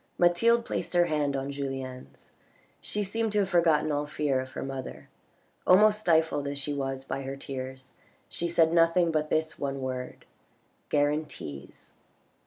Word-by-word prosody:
Mathilde 230 +7 +4
placed - - -3
her 175 0 +5
hand 150 -3 0
on 135 +1 -3
Julien's; 135 -2 -6 0.5
she 210 - -3
seemed 225 +3 -1
to 210 - +3
have 190 - -1
forgotten 165 -4 +3
all 145 0 -1
fear 145 -3 0
of 130 0 -9
her - - -4
mother. 135 -1 -7 0.6
Almost 210 +3 +6
stifled 160 -6 +2
as 140 0 -3
she 140 +1 -2
was 135 -1 -3
by 135 +1 -3
her 135 0 -5
tears, 130 -1 -7 0.3
she 170 - -3
said 165 -1 +3
nothing 165 0 +4
but 155 -1 0
this 160 0 -1
one 140 -1 -2
word: 130 -1 -5 0.3
" - - -41
Guarantees 145 - -2
145 Hz, 160 wpm, -28 LUFS, 135-170 Hz, 0.6 s, Almost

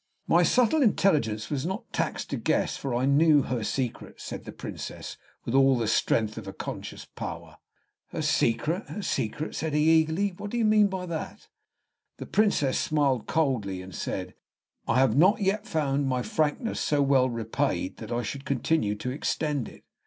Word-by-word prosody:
"My - - +4
subtle 255 +5 +3
intelligence 150 - +2
was 140 -3 -1
not 190 +5 -5
taxed - - -2
to - - -1
guess, - - 0
for 135 -3 -3
I 125 +2 +1
knew 145 +1 +5
her 125 -3 -2
secret," 125 +2 -3
said - - -7
the - - -7
Princess, - - -7 0.3
with 115 - -3
all 135 -1 +5
the 115 -2 -1
strength 110 0 +1
of 100 -3 -9
conscious - - -6
power. - - -8 0.5
"Her - - -4
secret 155 - +1
her 205 - -5
secret!" 150 - -2
said 155 -2 -2
he, 150 +1 +3
eagerly. 160 +6 0
"What 205 - -6
do 240 - -3
you 230 - +2
mean 215 -1 +5
by 190 -2 -4
that?" 165 -3 -6 0.7
The - - -7
Princess 200 -11 +2
smiled 145 -8 +1
coldly, 125 - 0
and 95 0 -11
said, - - -4 0.5
"I - - +2
have 130 -3 +4
not 185 +9 +5
yet 205 +2 0
found 145 -6 0
my 130 -1 0
frankness 155 - -1
so 145 -1 +2
well 135 -2 +3
repaid 115 -4 -2
that 110 0 -8
I 120 0 -1
should 135 +5 -5
continue 135 -5 0
to 125 +4 -4
extend 145 -1 -2
it." - - -16
140 Hz, 175 wpm, -27 LUFS, 120-165 Hz, 0.7 s, knew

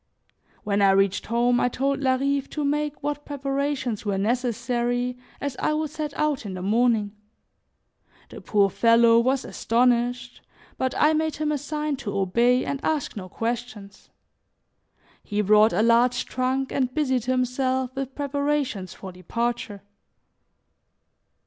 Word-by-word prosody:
When 205 -1 0
I 200 - +5
reached 195 0 +1
home, 240 +1 +2
I 245 - +2
told 275 +3 -1
Larive 275 +1 0
to 300 -2 -3
make 295 0 -2
what 290 0 -3
preparations 275 -4 -2
were 200 -2 -1
necessary 245 +2 -1 0.2
as 280 -2 -3
I 305 - +1
would 310 -1 -2
set 305 -1 -4
out 300 -4 0
in 195 -3 -6
the 180 - -6
morning. 220 0 +2 1.2
The - - -10
poor 200 -2 +2
fellow 230 +1 +5
was 260 +2 +1
astonished, 245 +1 0 0.4
but 260 -1 -1
I 300 +1 +4
made 315 0 0
him 305 0 -1
a 295 - -1
sign 300 0 -3
to 210 -6 -4
obey 235 +7 +2
and 280 0 -4
ask 310 -5 -1
no 185 -3 -7
questions. 225 -3 -5 1.1
He 210 -1 -2
brought 210 +2 +5
a 215 - +1
large 240 +2 +3
trunk 260 +1 -1
and 255 -2 0
busied 260 -4 0
himself 255 0 0
with 270 -1 -5
preparations 285 -9 -2
for 190 - -9
departure. 230 +4 -4
250 Hz, 140 wpm, -24 LUFS, 230-280 Hz, 1.2 s, I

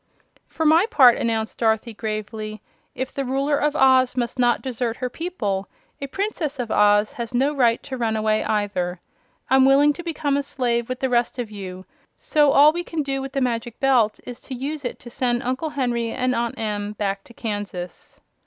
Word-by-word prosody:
"For 320 - -3
my 325 +7 +5
part," 260 - +6
announced 225 -1 -2
Dorothy, 220 0 +1
gravely, 215 0 -5 0.3
"if 260 0 -4
the 275 - -2
Ruler 275 +3 0
of 295 0 0
Oz 260 -2 +4
must 245 +1 -2
not 240 -1 +2
desert 240 -3 -2
her 250 -1 -3
people, 215 - -3 0.3
a 275 - -3
Princess 325 -4 -3
of 245 -3 -4
Oz 205 0 +4
has 235 0 -6
no 275 +4 +2
right 240 -5 +2
to 265 - -6
run 225 -2 0
away, 215 0 +1
either. 190 -4 -1 0.5
I'm 265 +1 +5
willing 280 +2 +5
to 345 - -8
become 300 -4 -1
a - - +1
slave 240 -4 -1
with 255 0 -4
the 265 - +1
rest 240 0 +1
of 235 -3 -4
you; 185 -2 -8 0.3
so 295 -2 +2
all 290 +2 +7
we 345 +1 -3
can 325 -3 -3
do 270 -1 -2
with 270 0 -6
the 275 - -1
Magic 235 -2 -2
Belt 250 -6 +3
is 245 -1 -8
to 260 - -7
use 285 +4 -4
it 245 - -3
to 240 - -11
send 240 -1 0
Uncle 260 +6 -2
Henry 240 -5 -1
and 255 +1 0
Aunt 235 -1 -2
Em 210 -1 -3
back 200 -1 -3
to 235 - -15
Kansas." 205 -5 -6
245 Hz, 200 wpm, -23 LUFS, 220-275 Hz, 0.5 s, all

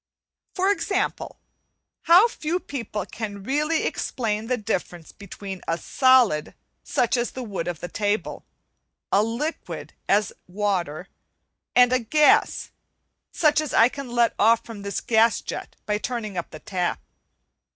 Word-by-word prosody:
For 380 +1 +2
example, 395 0 -2 0.7
how 355 +7 +7
few 345 -5 -3
people 230 - -5
can 205 -2 -6
really 300 +7 0
explain 220 -3 -2
the 250 0 0
difference 180 -6 -4
between 195 -2 -8
a 165 - 0
solid, 250 - +3 0.3
such 240 - +1
as 240 -1 0
the 260 - -7
wood 200 -7 -4
of 175 -3 -4
the 175 - -4
table; 205 +2 -2 0.7
a 200 - +5
liquid, 220 - -4 0.2
as 205 0 +2
water; 185 -4 -2 0.7
and 250 0 +6
a 255 - +3
gas, 295 +6 +3 0.6
such 305 -1 +3
as 305 -4 -4
I 230 - +6
can 275 -1 -7
let 240 -1 +2
off 230 +2 +4
from 225 -3 -9
this 200 -1 -3
gas 225 0 +3
jet - - -7
by 210 0 0
turning 230 -3 -4
the 175 -2 -5
tap. 185 -5 -1
225 Hz, 140 wpm, -24 LUFS, 200-260 Hz, 0.7 s, how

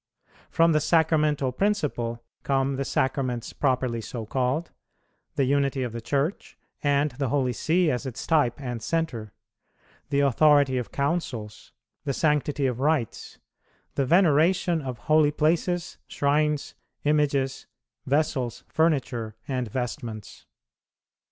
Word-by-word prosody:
From 165 0 +4
the 155 - +3
Sacramental 155 -4 +2
principle 125 - -1 0.2
come 135 0 0
the 135 - -1
Sacraments 130 -3 -1
properly 130 -4 0
so 115 +1 -6
called; 130 +8 -1 0.6
the 140 - +2
unity 140 0 +1
of 125 - -3
the 115 +1 -6
Church, 140 - -2 0.2
and 145 0 +2
the 130 0 -2
Holy 130 -1 +1
See 165 +6 +2
as 125 +2 -3
its 125 - -6
type 145 -7 +2
and 125 -4 -5
centre; 120 -7 -2 0.8
the 140 0 +2
authority 140 -1 +4
of 120 -5 -6
Councils; 140 -8 -3 0.3
the 140 -2 -1
sanctity 150 -1 +1
of 125 -2 -1
rites; 140 -5 -1 0.6
the 140 - 0
veneration 170 0 +3
of 130 -3 -5
holy 155 +3 +3
places, 165 +4 0
shrines, 150 +1 0 0.3
images, 140 -3 +1 0.4
vessels, 130 -4 0
furniture, 130 -9 0
and 125 -3 -2
vestments. 120 -2 -5
140 Hz, 120 wpm, -26 LUFS, 125-155 Hz, 0.8 s, From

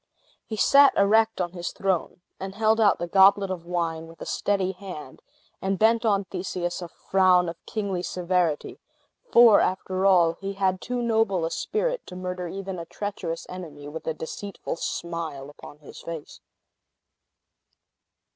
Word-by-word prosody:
He 220 - -4
sat 280 +5 +6
erect 220 +2 +3
on 175 -1 -1
his 175 -1 -4
throne, 190 -2 -2 0.2
and 190 0 -6
held 220 +1 +2
out 205 -3 +5
the 175 - -3
goblet 195 +2 +5
of 170 -2 -6
wine 165 -2 -2
with 165 0 -15
a - - -7
steady 195 -2 0
hand, 180 -8 -9 0.4
and 195 0 -1
bent 225 +2 +3
on 200 -2 +2
Theseus 180 -1 -4
a 175 - -5
frown 185 +1 +3
of 165 - -7
kingly 200 -4 -2
severity; 180 -3 -1 0.5
for, 235 -3 +8
after 185 +1 0
all, 170 -3 +4
he 195 0 -3
had 190 -1 0
too 245 -1 -3
noble 220 -7 +1
a 165 - -3
spirit - - -1
to 180 - -9
murder 180 -1 -4
even 190 0 -5
a 170 - -6
treacherous 185 -5 -5
enemy 155 -6 -9
with 160 +2 -8
a 160 - -1
deceitful 195 +3 -6
smile 160 -6 -4
upon 145 - -13
his 150 - -13
face. 165 -3 -8
185 Hz, 155 wpm, -25 LUFS, 170-200 Hz, 0.5 s, for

